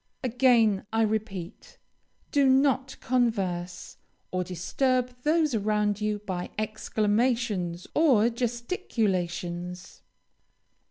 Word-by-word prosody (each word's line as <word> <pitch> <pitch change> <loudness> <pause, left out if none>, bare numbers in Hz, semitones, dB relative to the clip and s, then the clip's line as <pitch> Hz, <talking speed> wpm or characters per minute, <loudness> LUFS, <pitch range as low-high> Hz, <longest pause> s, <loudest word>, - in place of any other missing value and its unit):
Again, 240 -5 +3
I 225 0 +2
repeat, 210 -4 -4 0.5
do 285 -2 +4
not 265 0 +2
converse, 195 -8 -1 0.3
or 185 0 -1
disturb 250 - 0
those 310 0 +2
around 210 -1 0
you 210 0 0
by 180 -2 -4
exclamations 215 -3 0
or 245 -8 +4
gesticulations. 185 - -3
220 Hz, 85 wpm, -27 LUFS, 185-250 Hz, 0.5 s, do